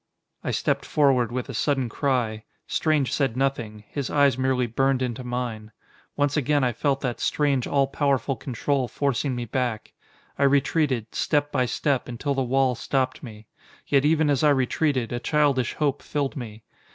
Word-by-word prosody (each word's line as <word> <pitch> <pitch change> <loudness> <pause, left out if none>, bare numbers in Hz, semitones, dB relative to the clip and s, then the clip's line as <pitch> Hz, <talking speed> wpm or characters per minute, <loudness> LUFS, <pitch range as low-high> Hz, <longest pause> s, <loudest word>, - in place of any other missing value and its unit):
I - - -2
stepped - - 0
forward 130 -6 +2
with 125 0 -3
a 135 - -6
sudden 135 +2 0
cry. 115 -4 -1 0.2
Strange 155 -5 +1
said 135 -4 0
nothing: 120 -6 -2
his 140 -4 -4
eyes 140 -2 +3
merely 130 -1 +1
burned 130 +3 +1
into 125 0 -3
mine. 120 -3 -4 0.4
Once 145 0 +1
again 145 -1 +2
I 125 -1 +1
felt 135 +3 0
that 125 -3 -2
strange, 140 -4 +1
all 140 -1 +2
powerful 135 -1 0
control 130 +2 -1
forcing 135 +1 -1
me 120 -1 -3
back. 120 -1 -3 0.5
I - - +3
retreated, 140 -4 +1
step 145 0 0
by 125 - +1
step, 140 +1 0
until 125 +4 -2
the 135 - 0
wall 130 0 +2
stopped 130 +2 -1
me. 110 -4 -10 0.4
Yet 140 -1 +3
even 155 0 +3
as 140 +1 +1
I 150 - +6
retreated, 135 -2 +1
a 120 - -2
childish 140 -2 +1
hope 145 -2 0
filled 145 -2 -2
me. 115 -5 -8
135 Hz, 170 wpm, -25 LUFS, 120-145 Hz, 0.5 s, I